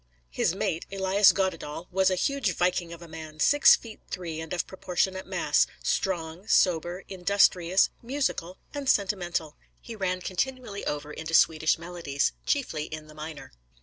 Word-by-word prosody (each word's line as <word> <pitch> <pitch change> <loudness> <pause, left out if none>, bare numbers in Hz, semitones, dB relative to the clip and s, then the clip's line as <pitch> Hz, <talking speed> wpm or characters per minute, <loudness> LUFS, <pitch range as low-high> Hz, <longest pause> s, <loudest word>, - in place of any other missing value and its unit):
His - - +1
mate, 165 - -2
Elias 195 +1 +5
Goddedaal, 165 -4 -2
was 190 +1 +3
a 185 - +1
huge 240 0 0
viking 175 -1 0
of 170 0 -9
a - - -11
man, 155 -1 -9
six 290 - +7
feet 225 -2 -11
three 170 -4 -5
and 160 - -8
of 180 - -1
proportionate 190 0 -2
mass, - - +2 0.2
strong, 175 0 -2
sober, 175 -1 +2
industrious, 185 -1 +3
musical, 235 -9 -2 0.2
and 285 -2 -3
sentimental. 175 -6 0 0.2
He 230 - -9
ran 185 -3 -1
continually 225 +2 -3
over 150 0 -3
into 160 +1 -3
Swedish 160 -1 +4
melodies, 165 -5 -2 0.2
chiefly 205 - 0
in 155 -1 -7
the 155 - -14
minor. 155 -2 -8
180 Hz, 150 wpm, -27 LUFS, 160-195 Hz, 0.2 s, six